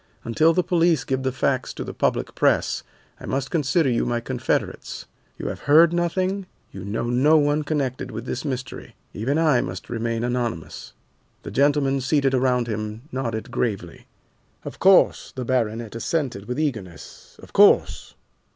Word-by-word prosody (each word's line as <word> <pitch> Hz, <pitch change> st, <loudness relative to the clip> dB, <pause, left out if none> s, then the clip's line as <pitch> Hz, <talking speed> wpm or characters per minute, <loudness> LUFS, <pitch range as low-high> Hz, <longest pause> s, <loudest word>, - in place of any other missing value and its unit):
Until 155 Hz, +8 st, +3 dB
the 180 Hz, +2 st, +1 dB
police 170 Hz, -4 st, +2 dB
give 130 Hz, 0 st, -2 dB
the 130 Hz, 0 st, -1 dB
facts 130 Hz, 0 st, -1 dB
to -, -, -4 dB
the -, -, -7 dB
public -, -, -1 dB
press, -, -, +1 dB, 0.4 s
I -, -, -9 dB
must 135 Hz, 0 st, -2 dB
consider 160 Hz, 0 st, +2 dB
you 120 Hz, -2 st, +1 dB
my 120 Hz, 0 st, -1 dB
confederates. 125 Hz, +1 st, -3 dB, 0.3 s
You -, -, -7 dB
have -, -, -6 dB
heard 160 Hz, +3 st, +7 dB
nothing, 185 Hz, +3 st, -1 dB, 0.2 s
you 95 Hz, -, -8 dB
know 105 Hz, +3 st, -3 dB
no 145 Hz, +6 st, +4 dB
one 145 Hz, 0 st, +2 dB
connected 140 Hz, -5 st, -2 dB
with 115 Hz, 0 st, -6 dB
this 130 Hz, -, -4 dB
mystery. 130 Hz, -4 st, -6 dB, 0.2 s
Even 130 Hz, +8 st, -1 dB
I 155 Hz, -6 st, +3 dB
must 90 Hz, +4 st, -6 dB
remain 115 Hz, 0 st, -2 dB
anonymous." 120 Hz, -9 st, -3 dB, 0.5 s
The -, -, -7 dB
gentlemen 140 Hz, -1 st, +2 dB
seated 135 Hz, 0 st, +1 dB
around 125 Hz, -2 st, +2 dB
him 110 Hz, 0 st, -5 dB
nodded 120 Hz, -2 st, -4 dB
gravely. 100 Hz, -9 st, -3 dB, 0.6 s
"Of -, -, -8 dB
course," 190 Hz, 0 st, +4 dB
the 130 Hz, -1 st, -4 dB
baronet 115 Hz, -3 st, -1 dB
assented 120 Hz, -3 st, -2 dB
with 125 Hz, +5 st, -4 dB
eagerness, 110 Hz, -, -5 dB
"of -, -, -15 dB
course." -, -, +4 dB
130 Hz, 160 wpm, -23 LUFS, 115-150 Hz, 0.6 s, heard